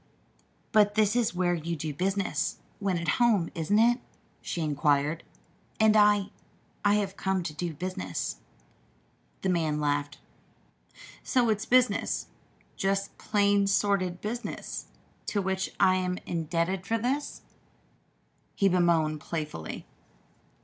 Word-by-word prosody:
"But 210 Hz, -2 st, +4 dB
this 215 Hz, 0 st, +3 dB
is 235 Hz, -6 st, +1 dB
where 180 Hz, -1 st, +2 dB
you 170 Hz, 0 st, -2 dB
do 155 Hz, -1 st, -4 dB
business, 185 Hz, -1 st, -1 dB, 0.2 s
when 195 Hz, -3 st, 0 dB
at 170 Hz, 0 st, -4 dB
home; 210 Hz, -8 st, +3 dB
isn't 170 Hz, +6 st, +1 dB
it?" 240 Hz, +3 st, +4 dB, 0.4 s
she 170 Hz, -, -3 dB
inquired. 150 Hz, +1 st, +1 dB, 0.6 s
"And 220 Hz, 0 st, +5 dB
I 205 Hz, -2 st, +4 dB, 0.5 s
I 205 Hz, 0 st, +4 dB
have 200 Hz, -2 st, -1 dB
come 190 Hz, -2 st, -1 dB
to 165 Hz, -2 st, -4 dB
do 165 Hz, +1 st, -4 dB
business." 95 Hz, -, -4 dB, 1.1 s
The 190 Hz, -, +1 dB
man 160 Hz, -4 st, +1 dB
laughed. 145 Hz, 0 st, -1 dB, 1.0 s
"So 245 Hz, -3 st, +2 dB
it's 215 Hz, 0 st, 0 dB
business 255 Hz, 0 st, +2 dB, 0.5 s
just 195 Hz, 0 st, -1 dB
plain 200 Hz, -1 st, +2 dB
sordid 195 Hz, -3 st, +1 dB
business 235 Hz, +3 st, -5 dB, 0.4 s
to 205 Hz, -, 0 dB
which 190 Hz, -1 st, -1 dB
I 185 Hz, 0 st, +5 dB
am 180 Hz, 0 st, -1 dB
indebted 170 Hz, +3 st, -1 dB
for 230 Hz, -, +1 dB
this," 265 Hz, +6 st, -2 dB, 1.1 s
he 195 Hz, -, +3 dB
bemoaned 170 Hz, -4 st, +2 dB
playfully. 150 Hz, -, -5 dB
185 Hz, 120 wpm, -28 LUFS, 165-205 Hz, 1.1 s, And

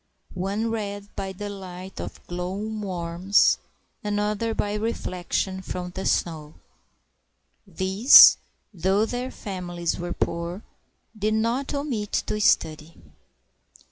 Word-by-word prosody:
One 200 Hz, +5 st, -2 dB
read 205 Hz, -2 st, -5 dB
by 195 Hz, -1 st, -4 dB
the 205 Hz, +2 st, -6 dB
light 190 Hz, -2 st, -8 dB
of -, -, -9 dB
glow 180 Hz, +1 st, -4 dB
worms, 195 Hz, -3 st, +1 dB, 0.4 s
another 210 Hz, +2 st, -1 dB
by 205 Hz, 0 st, -1 dB
reflec 210 Hz, -5 st, -4 dB
tion 190 Hz, -1 st, 0 dB
from 180 Hz, -1 st, -5 dB
the 190 Hz, +1 st, -4 dB
snow; 155 Hz, -2 st, -1 dB, 1.1 s
These, 190 Hz, -, +8 dB, 0.4 s
though 190 Hz, +4 st, +2 dB
their 245 Hz, +2 st, -3 dB
families 175 Hz, -7 st, -4 dB
were 175 Hz, 0 st, -3 dB
poor, 170 Hz, +4 st, -3 dB, 0.5 s
did 215 Hz, +1 st, 0 dB
not 235 Hz, +6 st, 0 dB
omit 250 Hz, -8 st, -3 dB
to 210 Hz, -, -2 dB
study. 155 Hz, -4 st, +1 dB
195 Hz, 110 wpm, -25 LUFS, 180-215 Hz, 1.1 s, These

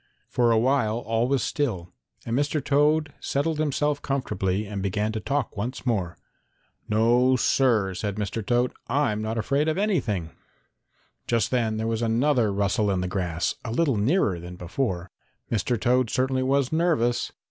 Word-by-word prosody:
For 120 Hz, -1 st, +2 dB
a 115 Hz, -, +4 dB
while 115 Hz, -2 st, +2 dB
all 115 Hz, 0 st, 0 dB
was 135 Hz, 0 st, +1 dB
still 95 Hz, -, -2 dB, 0.3 s
and 115 Hz, -, -1 dB
Mr. 145 Hz, +3 st, +1 dB
Toad 150 Hz, +1 st, +2 dB
settled 150 Hz, +3 st, -1 dB
himself 150 Hz, -1 st, 0 dB
comfortably 105 Hz, -7 st, -1 dB
and 100 Hz, -1 st, -5 dB
began 105 Hz, +3 st, -1 dB
to 110 Hz, -, -3 dB
talk 140 Hz, +1 st, -2 dB
once 120 Hz, +6 st, -4 dB
more. 95 Hz, -9 st, -1 dB, 0.7 s
"No, 120 Hz, +4 st, +4 dB
Sir," 115 Hz, -6 st, +2 dB
said 100 Hz, +2 st, -3 dB
Mr. 105 Hz, +1 st, -3 dB
Toad, 120 Hz, +4 st, +1 dB
"I'm 125 Hz, -5 st, +1 dB
not 110 Hz, +1 st, -3 dB
afraid 140 Hz, +7 st, +1 dB
of 160 Hz, +2 st, 0 dB
anything." 120 Hz, -, 0 dB, 1.0 s
Just 115 Hz, -1 st, +1 dB
then 115 Hz, -4 st, +1 dB
there 110 Hz, -, -2 dB
was 115 Hz, 0 st, -1 dB
another 120 Hz, 0 st, +2 dB
rustle 100 Hz, +2 st, +1 dB
in 95 Hz, -2 st, 0 dB
the 90 Hz, -, -2 dB
grass, 90 Hz, -3 st, -1 dB
a 115 Hz, -, -5 dB
little 140 Hz, +1 st, +2 dB
nearer 105 Hz, -, +1 dB
than 90 Hz, +1 st, -8 dB
before. 90 Hz, 0 st, -3 dB, 0.4 s
Mr. 115 Hz, +2 st, 0 dB
Toad 125 Hz, +1 st, +2 dB
certainly 130 Hz, +1 st, 0 dB
was 135 Hz, 0 st, +1 dB
nervous. 155 Hz, -8 st, +1 dB
115 Hz, 160 wpm, -25 LUFS, 105-135 Hz, 1.0 s, a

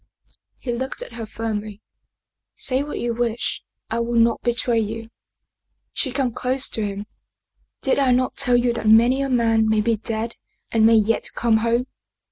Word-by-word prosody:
He 245 Hz, -, -4 dB
looked 260 Hz, +3 st, -3 dB
at -, -, -11 dB
her 230 Hz, -1 st, -6 dB
firmly. 215 Hz, -2 st, -4 dB, 0.4 s
" -, -, -59 dB, 0.3 s
Say 260 Hz, 0 st, 0 dB
what 295 Hz, +1 st, -5 dB
you 235 Hz, 0 st, -1 dB
wish, 235 Hz, 0 st, -2 dB, 0.3 s
I 230 Hz, -, 0 dB
will 235 Hz, 0 st, +1 dB
not 230 Hz, 0 st, +3 dB
betray 240 Hz, -1 st, +1 dB
you." 225 Hz, +1 st, -4 dB, 0.8 s
She 260 Hz, -, -1 dB
came 260 Hz, -1 st, 0 dB
close 255 Hz, +3 st, +1 dB
to 220 Hz, -, -2 dB
him. 205 Hz, 0 st, -4 dB, 0.4 s
" -, -, -47 dB
Did 270 Hz, -, +2 dB
I 270 Hz, -2 st, +3 dB
not 250 Hz, +1 st, +2 dB
tell 250 Hz, -3 st, +2 dB
you 240 Hz, 0 st, +2 dB
that 230 Hz, -, -3 dB
many 240 Hz, +5 st, +5 dB
a 275 Hz, -, -1 dB
man 225 Hz, -3 st, +2 dB
may 220 Hz, 0 st, +3 dB
be 225 Hz, +1 st, +1 dB
dead 225 Hz, +2 st, -3 dB, 0.3 s
and 220 Hz, -1 st, +4 dB
may 230 Hz, -, +5 dB
yet 220 Hz, +1 st, +2 dB
come 230 Hz, -2 st, +3 dB
home? 235 Hz, +2 st, +1 dB
235 Hz, 185 wpm, -22 LUFS, 225-250 Hz, 0.8 s, many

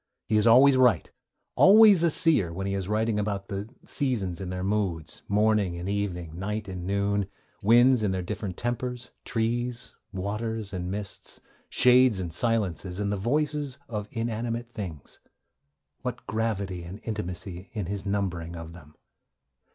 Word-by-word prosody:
He 110 Hz, -, 0 dB
is 105 Hz, +2 st, +4 dB
always 130 Hz, +4 st, +7 dB
right, 125 Hz, -3 st, +3 dB, 0.4 s
always 205 Hz, -2 st, +7 dB
a 170 Hz, -, +4 dB
seer, 145 Hz, -, +3 dB
when 95 Hz, +3 st, -4 dB
he 100 Hz, -, -2 dB
is 95 Hz, -2 st, -3 dB
writing 110 Hz, +1 st, 0 dB
about 100 Hz, -1 st, -3 dB
'the 100 Hz, +2 st, -4 dB
seasons 105 Hz, -, -2 dB
in 95 Hz, -, -5 dB
their 90 Hz, 0 st, -4 dB
moods, 95 Hz, -6 st, -2 dB
morning 105 Hz, -3 st, +2 dB
and 90 Hz, +2 st, -5 dB
evening, 90 Hz, -5 st, -3 dB
night 105 Hz, +2 st, -3 dB
and 90 Hz, -2 st, -6 dB
noon, 100 Hz, 0 st, 0 dB, 0.3 s
winds 120 Hz, +3 st, +5 dB
in 105 Hz, -, +1 dB
their 95 Hz, -1 st, -2 dB
different 100 Hz, -1 st, -5 dB
tempers, 125 Hz, +1 st, -3 dB
trees, 120 Hz, +2 st, -2 dB, 0.2 s
waters 105 Hz, +2 st, -4 dB
and 90 Hz, -1 st, -3 dB
mists, 100 Hz, 0 st, -6 dB, 0.3 s
shades 125 Hz, -4 st, +5 dB
and 85 Hz, -3 st, -4 dB
silences, 95 Hz, -3 st, 0 dB
and 100 Hz, -1 st, -1 dB
the -, -, 0 dB
voices 145 Hz, +5 st, -1 dB
of 105 Hz, -3 st, -4 dB
inanimate 115 Hz, +1 st, -3 dB
things.' 90 Hz, -, -8 dB, 0.8 s
(What -, -, -5 dB
gravity 100 Hz, -4 st, -2 dB
and 90 Hz, +5 st, -8 dB
intimacy 90 Hz, -3 st, -5 dB
in 105 Hz, -4 st, -3 dB
his 100 Hz, +2 st, -4 dB
numbering 95 Hz, -5 st, -2 dB
of 85 Hz, 0 st, -8 dB
them!) 75 Hz, -3 st, -15 dB
105 Hz, 150 wpm, -27 LUFS, 95-115 Hz, 0.8 s, always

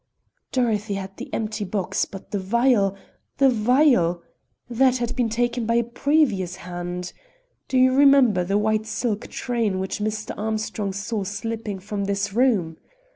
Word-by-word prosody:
"Dorothy 220 Hz, -5 st, 0 dB
had 195 Hz, 0 st, -6 dB
the -, -, -8 dB
empty 215 Hz, -1 st, -3 dB
box; 195 Hz, -1 st, -1 dB
but 195 Hz, -, -11 dB
the 205 Hz, -, -1 dB
vial! 205 Hz, 0 st, +2 dB, 0.4 s
the 275 Hz, -1 st, +5 dB
vial! 230 Hz, -, +3 dB, 0.4 s
that 255 Hz, +1 st, +3 dB
had 240 Hz, 0 st, -3 dB
been 245 Hz, -3 st, +1 dB
taken 240 Hz, 0 st, -1 dB
by 230 Hz, -, +2 dB
a 235 Hz, -, +3 dB
previous 235 Hz, -, +1 dB
hand. 175 Hz, 0 st, -6 dB, 0.5 s
Do 260 Hz, -, 0 dB
you 255 Hz, 0 st, +5 dB
remember 270 Hz, -8 st, +5 dB
the 195 Hz, +3 st, 0 dB
white 215 Hz, +1 st, 0 dB
silk 220 Hz, -4 st, -2 dB
train 230 Hz, -6 st, -1 dB
which 190 Hz, +2 st, -3 dB
Mr. 215 Hz, 0 st, -3 dB
Armstrong 215 Hz, -1 st, -2 dB
saw 205 Hz, +2 st, -3 dB
slipping 210 Hz, +1 st, -4 dB
from 200 Hz, +1 st, -4 dB
this 200 Hz, 0 st, -2 dB
room? 210 Hz, -10 st, +2 dB
215 Hz, 150 wpm, -23 LUFS, 195-240 Hz, 0.5 s, the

